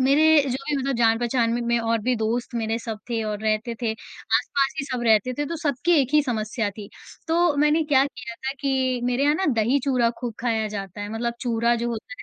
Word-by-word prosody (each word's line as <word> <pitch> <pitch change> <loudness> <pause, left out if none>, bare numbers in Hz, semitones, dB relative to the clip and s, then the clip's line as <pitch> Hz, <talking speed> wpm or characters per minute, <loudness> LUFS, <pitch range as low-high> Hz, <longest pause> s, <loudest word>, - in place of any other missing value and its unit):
मेरे 300 +4 +5
जो 250 - 0
भी 295 - +1
मतलब 270 -1 -1
जान-पहचान 235 +1 +2
में 240 - -1
में 235 0 +1
और 230 0 0
भी 250 +3 +1
दोस्त 230 +3 -2
मेरे 225 0 -1
सब 225 -2 -6
थे 230 -1 0
और 210 -1 -3
रहते 220 +2 0
थे। 230 - +1
आस-पास 275 +5 -1
ही 275 - -1
सब 255 -3 -3
रहते 220 +2 +3
थे 290 - 0
तो 335 - -4
सबकी 310 +1 0
एक 270 +2 -2
ही 300 - +6
समस्या 220 -4 -2
थी, 200 0 -10 0.4
तो 335 -2 +2
मैंने 300 +2 +3
क्या 275 -3 +4
किया 255 -4 -7
था 265 +2 -4
कि 260 -3 0
मेरे 250 +2 0
यहाँ 295 - +4
ना 380 +4 -1
दही 235 +5 +2
चूरा 250 -4 +2
खूब 240 -3 -4
खाया 225 -3 0
जाता 200 -1 -6
है 205 - -4
मतलब 235 +1 -2
चूरा 235 -1 +1
जो - - 0
होता 225 -2 -5
है 250 - -9
240 Hz, 230 wpm, -24 LUFS, 225-275 Hz, 0.4 s, ही